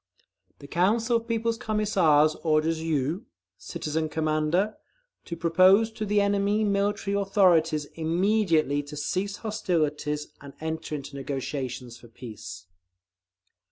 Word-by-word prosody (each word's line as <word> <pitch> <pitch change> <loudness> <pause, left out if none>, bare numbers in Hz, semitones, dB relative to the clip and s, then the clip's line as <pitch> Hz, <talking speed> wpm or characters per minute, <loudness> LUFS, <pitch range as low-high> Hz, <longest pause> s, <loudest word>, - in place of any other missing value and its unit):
The - - -13
Council 225 - +2
of 230 0 -8
People's 230 0 -1
Commissars 190 -10 +3
orders 160 0 +1
you, 160 - -1 0.3
Citizen 155 +1 -3
Commander,… 155 +6 0 0.5
to 170 - -5
propose 185 +6 +4
to 215 -1 -5
the 205 0 +2
enemy 200 +1 +1
military 200 0 0
authorities 175 -6 +3
immediately 165 -3 +1
to 145 +1 -10
cease 190 +7 -2
hostilities, 150 -8 -1
and 140 -1 -11
enter 160 -1 -4
into 140 -1 -7
negotiations 130 -3 -5
for 120 - -15
peace. 110 -5 -10
165 Hz, 115 wpm, -26 LUFS, 150-205 Hz, 0.5 s, propose